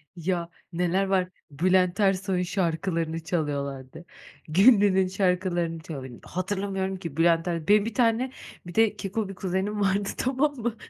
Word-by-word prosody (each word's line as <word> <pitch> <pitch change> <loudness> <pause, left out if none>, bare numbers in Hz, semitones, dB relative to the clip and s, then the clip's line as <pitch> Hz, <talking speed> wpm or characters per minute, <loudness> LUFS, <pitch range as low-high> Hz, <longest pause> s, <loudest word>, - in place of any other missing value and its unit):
Ya 170 0 -2 0.2
neler 180 +3 +1
var, 190 -2 +1 0.2
Bülent 180 +4 +2
Ersoy'un 190 -2 +1
şarkılarını 165 -2 -1
çalıyorlardı, 145 -2 -3 0.4
Güllü'nün 195 +1 +5
şarkılarını 180 -3 0
çalıyor. 135 -6 -8
Hatırlamıyorum 190 +1 -3
ki 165 -5 -7
Bülent 165 +1 +3
Ersoy, 165 -2 -3
benim 210 0 +5
bir 225 - -4
tane, 240 +2 +2 0.4
bir 175 - -9
de 225 -1 +3
keko 200 +1 -3
bir 195 - -7
kuzenim 190 +3 -2
vardı 200 0 +1
tamam 275 +3 +1
mı? 240 -3 -3
185 Hz, 140 wpm, -26 LUFS, 165-200 Hz, 0.4 s, Güllü'nün